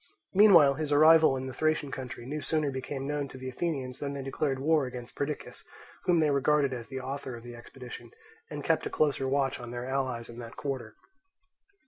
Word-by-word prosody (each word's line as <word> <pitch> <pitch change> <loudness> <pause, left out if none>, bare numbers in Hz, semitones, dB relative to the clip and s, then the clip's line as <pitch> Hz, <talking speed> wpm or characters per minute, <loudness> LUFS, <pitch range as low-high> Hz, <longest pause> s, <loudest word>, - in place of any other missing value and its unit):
Meanwhile 185 -8 +7
his 150 -1 -2
arrival 155 -1 +6
in 130 - -4
the 130 - -6
Thracian 155 0 0
country 130 -2 -6
no 150 +4 -4
sooner 150 -1 0
became 135 +1 -5
known 145 0 -2
to 135 - -11
the 130 0 -6
Athenians 135 -3 -3
than 140 -1 -3
they 140 - -5
declared 135 0 -1
war 150 0 +2
against 125 -1 -8
Perdiccas, 145 +1 -5 0.4
whom 175 -2 +4
they 155 -2 +3
regarded 140 0 +2
as 120 -2 -6
the 130 - -5
author 130 -1 -5
of 115 - -11
the 120 0 -9
expedition, 125 +1 -10 0.4
and - - -6
kept - - +1
a - - -4
closer 145 - +1
watch 135 -1 0
on 120 -1 -8
their 120 +1 -5
allies 130 -3 -2
in 120 0 -10
that 115 -1 -9
quarter. 130 -6 -4
135 Hz, 200 wpm, -29 LUFS, 130-150 Hz, 0.4 s, Meanwhile